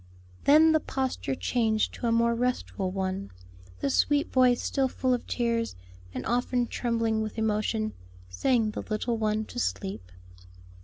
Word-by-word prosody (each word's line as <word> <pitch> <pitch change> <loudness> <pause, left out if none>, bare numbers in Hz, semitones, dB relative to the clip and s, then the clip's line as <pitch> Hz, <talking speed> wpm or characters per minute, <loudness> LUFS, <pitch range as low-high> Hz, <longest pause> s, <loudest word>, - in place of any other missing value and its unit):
Then, 315 +3 +7
the 315 - +4
posture 260 - -2
changed 220 - 0
to 240 - -3
a - - +2
more 235 0 +3
restful 235 -5 -1
one, 185 - -3 0.5
the 140 - +1
sweet 290 - +2
voice 250 -2 +5
still 270 -2 0
full 255 0 0
of 245 - -2
tears, 230 -1 -1 0.4
and 125 - -5
often 245 +1 +1
trembling 230 -2 0
with 215 +1 -4
emotion, 215 0 0 0.3
sang 215 - +1
the - - -4
little 225 +2 -2
one 215 0 0
to 245 - -6
sleep. 190 - -3
230 Hz, 150 wpm, -28 LUFS, 215-250 Hz, 0.5 s, Then